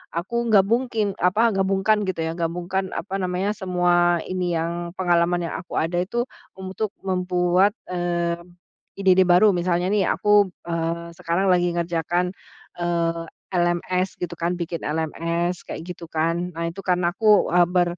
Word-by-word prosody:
aku 235 +8 -2
gabungking 220 +1 +2
apa 215 +6 +3
gabungkan 195 +2 +2
gitu 185 -3 -2
ya, 160 - -1
gabungkan 180 +3 -2
apa 195 -1 -4
namanya 185 +1 -1
semua 175 -2 +2
ini 180 -2 -1
yang 170 +1 -3
pengalaman 175 -1 +1
yang - - -4
aku 180 - -9
ada 175 +2 0
itu 235 +6 -1 0.4
untuk 190 +3 -4
membuat, 180 +1 +2 0.2
mmm, 175 -1 -1 0.6
ide-ide 190 -1 +5
baru, 185 +3 +5
misalnya 175 0 0
nih 200 0 +2
aku, 205 -2 +3 0.2
eee, 170 0 -3
sekarang 180 +2 0
lagi 175 -1 +3
ngerjakan, 175 +1 -1 0.4
eee, 170 -1 -1 0.3
LMS 180 +1 0
gitu 175 - -4
kan 170 +1 -1
bikin 170 -1 -4
LMS 170 +3 -2
kayak - - -6
gitu 175 0 -8
kan. 165 +2 -1
Nah, 165 0 -2
itu 195 +4 -9
kan 180 -1 +2
aku 205 +4 +3 0.2
ber 175 0 0
180 Hz, 145 wpm, -23 LUFS, 170-190 Hz, 0.6 s, ide-ide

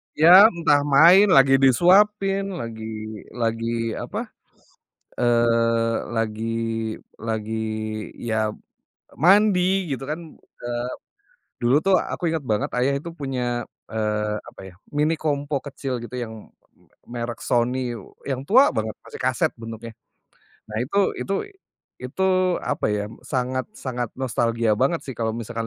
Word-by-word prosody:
Ya 180 +7 +9
entah 165 -8 +2
main, 170 +8 +7
lagi 135 -6 +5
disuapin, 195 - +3
lagi 115 -7 -6 0.5
lagi 115 0 -1
apa, - - -5 0.9
eee, 115 -1 +2 0.2
lagi 115 0 -2 0.7
lagi 110 0 -3 0.7
ya 110 -1 0 0.6
mandi 190 - +4
gitu 135 - -4
kan, 155 - -2 0.4
eee, 120 0 -3 0.7
dulu 120 +3 +4
tuh 195 +1 +2
aku 175 -1 -2
inget 160 -3 -2
banget 105 -3 -1
ayah 125 +3 +2
itu 155 - -8
punya, 125 -4 -2 0.2
eee, 105 -1 -1
apa - - -13
ya, 90 - -15 0.2
Mini 150 +2 +2
Compo 145 -1 -2
kecil 135 -2 -4
gitu 120 - -9
yang 115 -2 -5 0.8
me 120 - -5
merek 115 -1 -4
Sony 125 +1 0 0.4
yang 130 0 -2
tua 260 +7 +6
banget, 110 0 -2
masih - - -10
kaset - - +1
bentuknya. 115 0 -8 0.8
Nah 105 - -6
itu 150 +10 -6 0.2
itu 195 - -3 0.7
itu 130 +9 -4 0.4
apa 145 - -1
ya 105 0 -1 0.2
sangat-sangat 130 - -3
nostalgia 115 -3 0
banget 140 +8 +1
sih 135 - -6
kalau 115 -1 0
misalkan 115 0 -4
125 Hz, 125 wpm, -23 LUFS, 115-155 Hz, 0.9 s, Ya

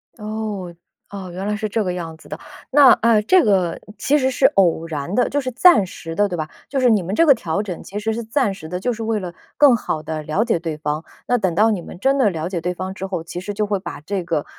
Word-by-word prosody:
哦， 210 -5 -5 0.4
啊， 195 -2 -7
原 185 +3 -5
来 210 - 0
是 215 0 -3
这 220 +1 0
个 180 -2 -2
样 165 -2 -6
子 - - -17
的。 - - -7 0.3
那， 275 -2 +8
啊， 225 -2 +4
这 360 - +4
个 185 -5 +1 0.2
其 290 - +2
实 265 -2 +1
是 265 +1 +1
偶 175 - +2
然 155 +2 -4
的， 245 +2 +2
就 285 - 0
是 255 -1 -4
暂 260 - +5
时 165 -3 -8
的 205 +3 +2
对 180 -3 -4
吧？ 155 -1 -4 0.2
就 275 - -1
是 255 -1 +4
你 210 -5 +3
们 185 +3 -4
这 330 - +4
个 290 - +8
调 170 0 -2
整 190 -5 -6
其 205 - -6
实 220 +1 -1
是 235 +1 -4
暂 225 -2 0
时 160 -5 -10
的， 180 +2 -4
就 245 +6 -1
是 225 0 -6
为 220 -1 0
了 180 -3 -6 0.2
更 285 -4 +6
好 160 -8 -3
地 155 0 -5
了 155 +8 0
解 230 -6 +1
对 165 -2 -4
方。 150 +1 -3 0.2
那 245 - +3
等 190 -6 0
到 215 +6 +4
你 200 -5 -2
们 175 - -11
真 270 +6 +2
的 255 -6 +4
了 165 -3 -4
解 185 -3 -2
对 180 +2 -2
方 185 +1 -5
之 190 - -6
后， 185 -4 -4
其 170 +1 -6
实 205 +3 -5
就 210 +1 -1
会 200 -1 -1
把 185 - -8
这 190 +4 -3
个， 165 -4 -2
200 Hz, 295 characters per minute, -20 LUFS, 175-225 Hz, 0.4 s, 那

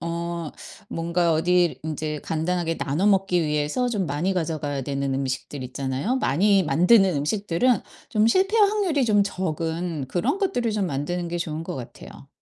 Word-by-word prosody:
어 170 -1 -4 0.4
뭔가 170 +1 0
어디를 175 +2 +2
인제 155 -1 -4
간단하게 165 +1 -1
나눠 155 +8 0
먹기 195 -3 +3
위해서 150 +11 0
좀 205 -6 -1
많이 155 +6 -1
가져가야 155 -5 -2
되는 140 0 -2
음식들 135 +1 -3
있잖아요. 135 - -2
많이 195 - +3
만드는 180 +4 +4
음식들은 200 - +1 0.3
좀 215 0 +2
실패할 395 - +4
확률이 380 -10 +1
좀 210 -3 +4
적은 165 -4 -3
그런 175 - 0
것들을 355 - 0
좀 205 -3 0
만드는 170 +5 -3
게 175 +1 -3
좋은 160 -1 -3
것 - - -5
같아요. 125 -3 -10
170 Hz, 340 characters per minute, -24 LUFS, 150-200 Hz, 0.4 s, 만드는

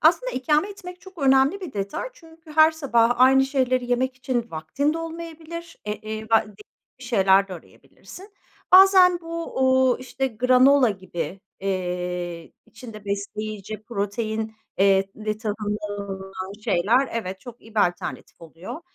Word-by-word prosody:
Aslında - - +3
ikame 300 +8 +1
etmek 360 -3 -10
çok 375 -2 -15
önemli 270 +6 +3
bir 350 -7 -7
detay. 200 - -4
Çünkü 325 -7 -18
her 315 +1 +6
sabah 245 -7 +2
aynı 265 +1 +6
şeyleri 255 -2 0
yemek 255 +1 0
için 240 -2 -2
vaktin 275 - -1
de - - -3
olmayabilir. 330 0 -8
Eee, 210 0 -3
eee, 215 0 -5
va 225 0 +4
değişik 210 0 -16 0.3
bir 255 - -11
şeyler 195 -4 +3
de 185 - -8
arayabilirsin. 375 - -14 0.4
Bazen 370 -2 +7
bu, 335 -4 -5
uuu, 260 -1 +3
işte, 255 +1 -3
granola 255 +2 +4
gibi, 190 -1 -6 0.2
eee, 180 -3 -3
içinde 220 -2 -11
besleyici 210 +1 -5
protein, 220 +1 -3 0.2
eee, 195 0 +4
ve 215 0 -3
tahıllı 210 -1 -4
olan 190 0 -7
şeyler, 230 +6 +2
evet, 190 -4 -4
çok 245 -1 -11
iyi 225 0 -17
bir 215 - +3
alternatif 175 +1 -8
oluyor. 170 - -9
235 Hz, 145 wpm, -24 LUFS, 200-285 Hz, 0.4 s, Bazen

